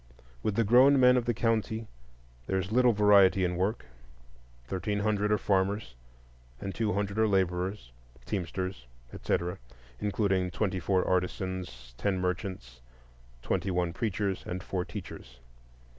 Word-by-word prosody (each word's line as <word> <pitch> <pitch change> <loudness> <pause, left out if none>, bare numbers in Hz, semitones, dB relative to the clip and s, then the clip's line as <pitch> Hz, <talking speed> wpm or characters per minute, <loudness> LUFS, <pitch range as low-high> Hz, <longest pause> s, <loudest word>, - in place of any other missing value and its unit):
With 105 - -1
the 115 - +3
grown 130 +6 +6
men 125 0 +6
of 125 -2 +1
the 120 - +1
county 110 -1 0 0.6
there 95 - 0
is 95 +1 -3
little 125 +1 +5
variety 100 -3 +5
in 90 0 -1
work: 95 - -1 0.8
thirteen 100 - -2
hundred 105 0 +1
are 105 - +4
farmers, 100 - 0 0.7
and 95 +6 -5
two 110 -3 -1
hundred 100 +1 -2
are 110 - +4
laborers, 95 - -1 0.3
teamsters, 90 - -4 0.3
etc., 90 +1 -2 0.4
including 95 -3 0
twenty 95 0 -1
four 90 +2 +1
artisans, 90 -9 -3
ten 100 -2 0
merchants, 90 -9 -4 0.6
twenty 100 - -1
one 90 -2 0
preachers, 100 -3 -2
and 90 +1 -4
four 95 -2 -2
teachers. 60 -7 -9
95 Hz, 135 wpm, -29 LUFS, 90-105 Hz, 0.8 s, grown